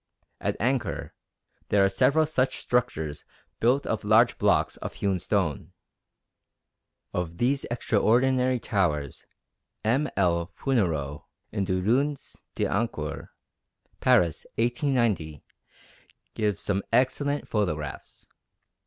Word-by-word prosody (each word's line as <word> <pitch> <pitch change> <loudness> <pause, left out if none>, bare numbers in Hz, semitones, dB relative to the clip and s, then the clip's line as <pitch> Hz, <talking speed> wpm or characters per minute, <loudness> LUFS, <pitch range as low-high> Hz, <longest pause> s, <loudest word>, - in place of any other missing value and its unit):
At - - -2
Angkor 125 +3 -1 0.6
there 100 -1 +4
are - - +3
several 155 +10 +3
such 135 -4 0
structures 80 -12 -1 0.4
built 125 +5 +2
of 110 - -2
large 110 +3 +4
blocks - - +2
of - - -7
hewn 95 -2 0
stone. 85 - -1 1.4
Of 85 -1 -3
these 135 +5 +1
extraordinary 125 +3 +2
towers 80 - -1 0.6
M. 130 +6 +2
L. 85 -3 +1
Fournereau 80 - -1 0.3
in 100 -3 -1
Des 95 0 0
Ruines 135 +8 -1
d' - - -5
Angkor - - -2 0.7
(Paris, 85 -3 +3
1890) 115 - 0 0.9
gives 105 -4 -1
some 100 -1 0
excellent 145 +3 +1
photographs. 80 - -3
105 Hz, 100 wpm, -26 LUFS, 90-130 Hz, 1.4 s, there